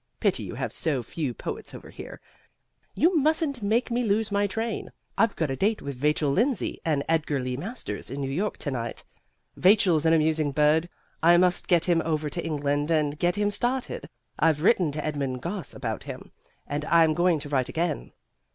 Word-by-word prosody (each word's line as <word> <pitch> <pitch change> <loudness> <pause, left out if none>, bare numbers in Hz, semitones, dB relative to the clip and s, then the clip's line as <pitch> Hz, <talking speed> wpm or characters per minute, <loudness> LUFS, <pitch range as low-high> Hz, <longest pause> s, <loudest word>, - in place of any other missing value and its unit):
Pity - - +1
you - - -6
have - - -3
so 145 -7 -1
few 145 +1 -3
poets - - -6
over - - -11
here. - - -9 0.8
You 335 0 +3
mustn't 305 -3 +1
make 225 +5 +1
me 245 +1 +1
lose 215 0 +1
my 205 0 +2
train; 225 +2 -3 0.2
I've 225 +1 +2
got 155 -4 -1
a - - -1
date 210 +8 +1
with 140 - -5
Vachel 150 -1 +2
Lindsay 235 - 0
and 150 -4 0
Edgar 155 -3 +1
Lee 125 0 -3
Masters 170 - -5
in 135 +3 -5
New 135 -1 -2
York 200 +9 -1
to 145 - -4
night. 120 -2 -4 0.5
Vachel's 180 -5 +4
an 160 - +5
amusing 155 -2 +2
bird. 155 +4 +3 0.3
I 170 +1 +6
must 180 0 +2
get 170 -2 +3
him 170 -2 +3
over 155 -2 -1
to 170 - -3
England 145 -1 -1
and 150 -2 +1
get 175 +1 +2
him 205 0 +1
started. 245 +4 -2 0.3
I've 155 -1 +2
written 185 -6 +4
to 150 0 -3
Edmund 140 -4 -3
Gosse 180 +1 -4
about - - -4
him, - - -9 0.3
and 145 +1 -3
I'm 165 -1 +4
going 175 0 +3
to 145 0 -7
write 130 -3 0
again. 165 -2 -2
165 Hz, 190 wpm, -26 LUFS, 145-200 Hz, 0.8 s, I